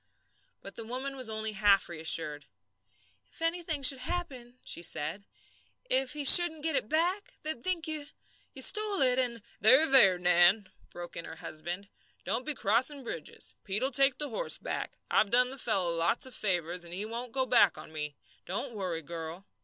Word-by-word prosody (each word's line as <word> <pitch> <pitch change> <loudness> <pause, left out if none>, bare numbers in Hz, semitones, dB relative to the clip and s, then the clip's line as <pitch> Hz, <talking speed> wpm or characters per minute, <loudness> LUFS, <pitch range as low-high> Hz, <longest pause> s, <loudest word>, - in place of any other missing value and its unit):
But 195 - -12
the 230 - -6
woman 260 +4 -6
was 255 -4 -3
only 220 0 -3
half 200 -1 +2
reassured. 155 -3 -1 0.8
"If - - -16
anything 330 -3 -1
should 265 0 +4
happen," 255 -5 -5
she - - -3
said, 165 +4 -3 0.7
"if 265 +1 0
he 295 -1 -6
shouldn't 320 0 +9
get 320 -2 +1
it 215 - -2
back, 355 +6 0
they'd 310 -6 -2
think 360 -3 -1
you 310 -2 -2 0.5
you - - -1
stole 425 -2 +3
it, 255 -1 +5
and 235 -4 -3
" - - -29
"There, 260 +9 +6
there, 235 - +7
Nan!" 180 +3 +2 0.2
broke 175 0 -10
in 170 - -7
her 160 - -10
husband, 175 +5 -7 0.4
"don't 230 +9 -3
be 300 - -1
crossing 255 +7 0
bridges. 165 -10 -8
Pete'll 210 +8 -2
take 275 0 +2
the 295 -1 -5
horse - - -2
back. - - -6 0.2
I've 215 - +2
done 250 +2 +2
the 270 - -8
fellow 190 -8 +1
lots 170 +9 +1
of 260 - -9
favours, 180 -4 -3
and 170 0 -9
he 200 +3 -5
won't 235 +2 -7
go 260 +1 -2
back 230 -7 +3
on - - -12
me. 150 -2 -6 0.3
Don't 230 +8 -5
worry, 180 -6 -5
girl!" 165 +3 -9
230 Hz, 185 wpm, -28 LUFS, 180-275 Hz, 0.8 s, shouldn't